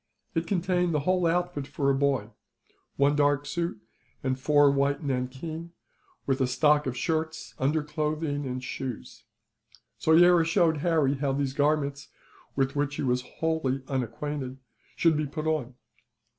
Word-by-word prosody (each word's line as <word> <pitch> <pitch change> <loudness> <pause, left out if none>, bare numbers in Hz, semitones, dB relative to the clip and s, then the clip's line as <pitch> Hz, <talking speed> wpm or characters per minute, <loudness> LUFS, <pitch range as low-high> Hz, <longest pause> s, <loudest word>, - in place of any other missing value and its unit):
It 165 -1 -1
contained 180 -2 +1
the 150 - +1
whole 180 +2 +2
outfit 175 -4 -1
for 145 -1 0
a - - +2
boy: 135 -6 0 0.6
one 140 +1 +3
dark 145 -1 +2
suit, 170 -6 -3 0.4
and 130 -1 -1
four 145 +1 +4
of - - +2
white 140 +1 +1
nankeen; 140 +6 -4 0.5
with 135 0 0
a 130 - +3
stock 150 +3 +3
of 125 -1 -3
shirts, 160 +2 -2
underclothing, 150 0 -1
and 130 0 -4
shoes. 130 -2 -6 0.7
Soyera 170 +1 +6
showed 165 -1 +2
Harry 155 -3 +2
how 135 -1 0
these 135 -1 -1
garments, 145 -1 0 0.5
with 135 0 0
which 145 0 -1
he - - -3
was 125 -1 +1
wholly 140 -2 -2
unacquainted, 130 +1 -3 0.4
should 165 -2 +3
be 150 0 -1
put 155 +2 -5
on. 145 -6 -1
145 Hz, 145 wpm, -27 LUFS, 135-160 Hz, 0.7 s, Soyera